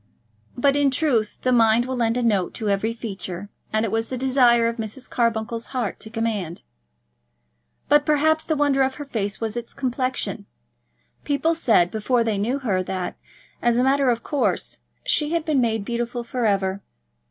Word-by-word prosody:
But 275 Hz, +3 st, +3 dB
in 285 Hz, -1 st, +3 dB
truth 260 Hz, -6 st, 0 dB
the 255 Hz, -, +2 dB
mind 230 Hz, 0 st, +4 dB
will 260 Hz, 0 st, -3 dB
lend 230 Hz, -1 st, +1 dB
a 250 Hz, -, 0 dB
tone 195 Hz, -5 st, +1 dB
to 220 Hz, -3 st, -2 dB
every 200 Hz, +3 st, +1 dB
feature, 200 Hz, -4 st, -6 dB, 0.2 s
and 215 Hz, +1 st, +1 dB
it 215 Hz, -, -3 dB
was 225 Hz, +1 st, 0 dB
the 255 Hz, -, -4 dB
desire 245 Hz, -3 st, +4 dB
of 230 Hz, +1 st, -2 dB
Mrs. 225 Hz, +3 st, -6 dB
Carbuncle's 230 Hz, -1 st, -1 dB
heart 230 Hz, -6 st, -2 dB
to 220 Hz, -, -8 dB
command. 220 Hz, -7 st, -3 dB, 1.2 s
But 295 Hz, +1 st, +5 dB
perhaps 310 Hz, +1 st, +3 dB
the 315 Hz, -, -1 dB
wonder 285 Hz, -2 st, +2 dB
of 265 Hz, 0 st, +1 dB
her 290 Hz, -, -7 dB
face 205 Hz, -7 st, -3 dB
was 225 Hz, -1 st, -3 dB
its 240 Hz, -1 st, -6 dB
complexion. 255 Hz, -1 st, -2 dB, 0.8 s
People 290 Hz, +3 st, +1 dB
said, 225 Hz, -, +3 dB
before 230 Hz, +3 st, +1 dB
they 220 Hz, -3 st, -1 dB
knew 240 Hz, +7 st, 0 dB
her, 210 Hz, -9 st, 0 dB
that, 185 Hz, 0 st, -4 dB, 0.5 s
as 240 Hz, 0 st, +2 dB
a 250 Hz, -, +3 dB
matter 270 Hz, 0 st, +3 dB
of 235 Hz, -1 st, 0 dB
course, 290 Hz, -3 st, -1 dB, 0.2 s
she 320 Hz, -11 st, +2 dB
had 335 Hz, -2 st, 0 dB
been 300 Hz, -5 st, +2 dB
made 225 Hz, -3 st, 0 dB
beautiful 240 Hz, +1 st, -3 dB
for 235 Hz, -1 st, -1 dB
ever. 195 Hz, -1 st, 0 dB
235 Hz, 180 wpm, -23 LUFS, 220-270 Hz, 1.2 s, But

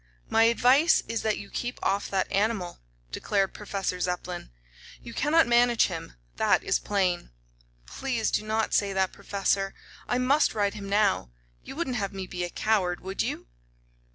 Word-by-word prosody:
"My 225 Hz, 0 st, +5 dB
advice 255 Hz, +7 st, +4 dB
is 230 Hz, 0 st, -2 dB
that 215 Hz, -1 st, 0 dB
you 200 Hz, -, -9 dB
keep 245 Hz, +1 st, -4 dB
off 200 Hz, +1 st, 0 dB
that 190 Hz, -1 st, -1 dB
animal," 200 Hz, -3 st, 0 dB, 0.3 s
declared 195 Hz, -, 0 dB
Professor 195 Hz, -3 st, -3 dB
Zepplin. 180 Hz, -, -3 dB, 0.5 s
"You 235 Hz, -, -9 dB
cannot 320 Hz, +5 st, +3 dB
manage 240 Hz, 0 st, +4 dB
him; -, -, -6 dB, 0.2 s
that -, -, +3 dB
is -, -, +1 dB
plain." 185 Hz, -, 0 dB, 0.6 s
"Please 235 Hz, -, -2 dB
do -, -, 0 dB
not 220 Hz, +1 st, -1 dB
say 200 Hz, -1 st, +2 dB
that, 190 Hz, -1 st, 0 dB
Professor. 195 Hz, -1 st, -1 dB, 0.3 s
I 245 Hz, -, +1 dB
must 270 Hz, +3 st, +2 dB
ride 205 Hz, -2 st, +1 dB
him 200 Hz, -2 st, -7 dB
now. 200 Hz, -, +2 dB, 0.3 s
You -, -, -9 dB
wouldn't 265 Hz, -6 st, -2 dB
have 200 Hz, -2 st, -3 dB
me 190 Hz, -1 st, -5 dB
be 180 Hz, -1 st, -4 dB
a 175 Hz, -, -3 dB
coward, 185 Hz, -4 st, 0 dB
would 190 Hz, +1 st, -3 dB
you?" -, -, -3 dB
205 Hz, 165 wpm, -27 LUFS, 190-235 Hz, 0.6 s, My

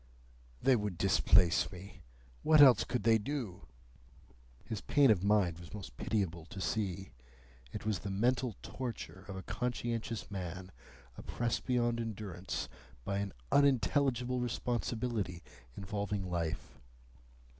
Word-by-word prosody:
They 135 Hz, -, +6 dB
would 105 Hz, -5 st, -2 dB
displace 90 Hz, -1 st, +4 dB
me. 95 Hz, +2 st, -11 dB, 0.4 s
What 155 Hz, -1 st, +5 dB
else 135 Hz, -4 st, +8 dB
could 125 Hz, -, -2 dB
they 115 Hz, -1 st, +5 dB
do?" 115 Hz, -6 st, -4 dB, 1.0 s
His 110 Hz, -3 st, -4 dB
pain 140 Hz, -5 st, +5 dB
of 95 Hz, -4 st, +2 dB
mind 100 Hz, -5 st, +2 dB
was 85 Hz, +4 st, -10 dB
most 90 Hz, -12 st, -8 dB
pitiable 85 Hz, -, -2 dB
to 95 Hz, -, -8 dB
see. 95 Hz, -2 st, -2 dB, 0.6 s
It -, -, -6 dB
was 105 Hz, -4 st, 0 dB
the 90 Hz, -, -5 dB
mental 120 Hz, +3 st, +1 dB
torture 115 Hz, -6 st, -6 dB
of 100 Hz, -, -6 dB
a 95 Hz, -, -6 dB
conscientious 115 Hz, +1 st, -3 dB
man, 95 Hz, -1 st, -5 dB, 0.5 s
oppressed 120 Hz, -1 st, -2 dB
beyond 120 Hz, -2 st, +2 dB
endurance 100 Hz, -5 st, -4 dB, 0.4 s
by 100 Hz, 0 st, -1 dB
an 100 Hz, -1 st, -2 dB, 0.2 s
unintelligible 130 Hz, -1 st, +3 dB
responsibility 120 Hz, -5 st, -2 dB, 0.3 s
involving 100 Hz, 0 st, -3 dB
life. 85 Hz, -7 st, -3 dB
105 Hz, 125 wpm, -33 LUFS, 95-120 Hz, 1.0 s, else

